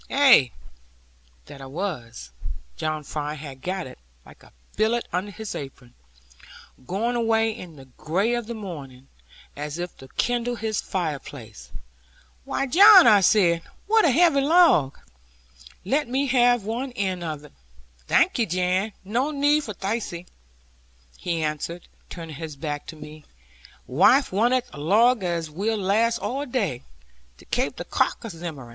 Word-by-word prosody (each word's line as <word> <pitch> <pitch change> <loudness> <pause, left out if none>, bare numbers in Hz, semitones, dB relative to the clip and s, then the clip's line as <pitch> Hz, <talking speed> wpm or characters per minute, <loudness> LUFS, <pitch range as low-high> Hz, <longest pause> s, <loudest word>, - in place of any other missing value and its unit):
Ay, 265 - +6 1.0
that 140 - -12
I 135 - -8
was; 130 - -6 0.4
John 155 -1 -3
Fry 150 +1 -4
had 140 -3 -10
got 185 +2 -3
it, 130 - -12 0.3
like - - -17
a - - -19 0.2
billet 225 +3 0
under 185 +4 -2
his 220 +1 -7
apron, 135 -3 -9 0.9
going 225 +6 -1
away 225 -1 +2
in 175 -8 -10
the 135 -2 -13
gray 175 - -1
of 240 -2 -2
the 235 - -5
morning, 140 - -9 0.5
as 150 +2 -5
if 175 0 -5
to 130 - -12
kindle 245 0 0
his 220 -2 -2
fireplace. 140 - -6 0.8
'Why, 275 - -1
John,' 385 - +8
I 210 -3 +6
said, 175 -3 +3 0.2
'what 445 +1 +4
a - - +5
heavy 295 0 +4
log! 290 - +4 0.9
Let 280 +8 0
me 265 +3 0
have 245 -3 +3
one 240 +5 -4
end 190 -5 -2
of 155 -3 -5
it.' 150 - -17 0.5
'Thank'e, 230 -3 +2
Jan, 185 +4 0
no 240 +8 0
need 290 -2 +1
of 205 - -6
thiccy,' 195 -4 -4 0.9
he 170 -2 -3
answered, 155 +3 -4 0.2
turning 165 -4 -8
his 160 -2 -7
back 145 0 -5
to - - -8
me; 150 0 -11 0.6
'waife 245 - +4
wanteth 240 +5 +1
a - - -9
log 220 +8 +3
as 170 -3 -2
will 210 +7 -1
last 215 +4 +1
all 275 +3 -3
day, 200 - -2 0.6
to - - -18
kape - - -1
the - - -7
crock - - -1
a 225 - -5
zimmerin.' 160 -7 -8
190 Hz, 150 wpm, -24 LUFS, 155-240 Hz, 1.0 s, John